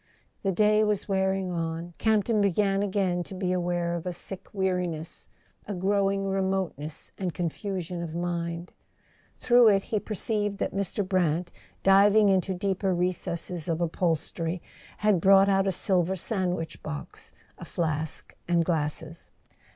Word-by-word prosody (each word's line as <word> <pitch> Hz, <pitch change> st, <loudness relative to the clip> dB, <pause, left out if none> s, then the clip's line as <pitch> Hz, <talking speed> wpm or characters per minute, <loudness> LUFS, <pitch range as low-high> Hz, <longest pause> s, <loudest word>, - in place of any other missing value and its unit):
The 195 Hz, -, +1 dB
day 210 Hz, +3 st, +4 dB
was 210 Hz, -2 st, 0 dB
wearing 190 Hz, -1 st, 0 dB
on—Campton 175 Hz, +7 st, 0 dB
began 200 Hz, 0 st, +2 dB
again 190 Hz, -3 st, 0 dB
to 190 Hz, -, -7 dB
be 185 Hz, -1 st, -1 dB
aware 175 Hz, -1 st, 0 dB
of 170 Hz, +1 st, -4 dB
a 180 Hz, -, -2 dB
sick 190 Hz, +2 st, -7 dB
weariness, 180 Hz, -4 st, -2 dB, 0.4 s
a 205 Hz, -, -3 dB
growing 195 Hz, +1 st, +1 dB
remoteness 190 Hz, -6 st, -2 dB
and 185 Hz, -3 st, -2 dB
confusion 180 Hz, 0 st, -3 dB
of 165 Hz, -1 st, -5 dB
mind. 170 Hz, 0 st, -3 dB, 0.6 s
Through 245 Hz, -1 st, +5 dB
it 195 Hz, -2 st, +4 dB
he 215 Hz, -, -1 dB
perceived 205 Hz, -1 st, -2 dB
that -, -, -2 dB
Mr. 195 Hz, 0 st, -1 dB
Brant, 175 Hz, -2 st, +1 dB, 0.3 s
diving 200 Hz, +2 st, +6 dB
into 190 Hz, 0 st, +2 dB
deeper 190 Hz, 0 st, 0 dB
recesses 175 Hz, -1 st, -2 dB
of 165 Hz, -1 st, 0 dB
upholstery, 165 Hz, 0 st, -1 dB, 0.4 s
had 210 Hz, -5 st, +2 dB
brought 195 Hz, +1 st, +6 dB
out 195 Hz, 0 st, +3 dB
a -, -, +3 dB
silver 185 Hz, 0 st, +1 dB
sandwich 180 Hz, -4 st, -2 dB
box, 70 Hz, -3 st, -7 dB, 0.3 s
a -, -, -8 dB
flask 160 Hz, -2 st, -3 dB
and 170 Hz, -1 st, +2 dB
glasses. 160 Hz, 0 st, -3 dB
185 Hz, 135 wpm, -27 LUFS, 170-195 Hz, 0.6 s, diving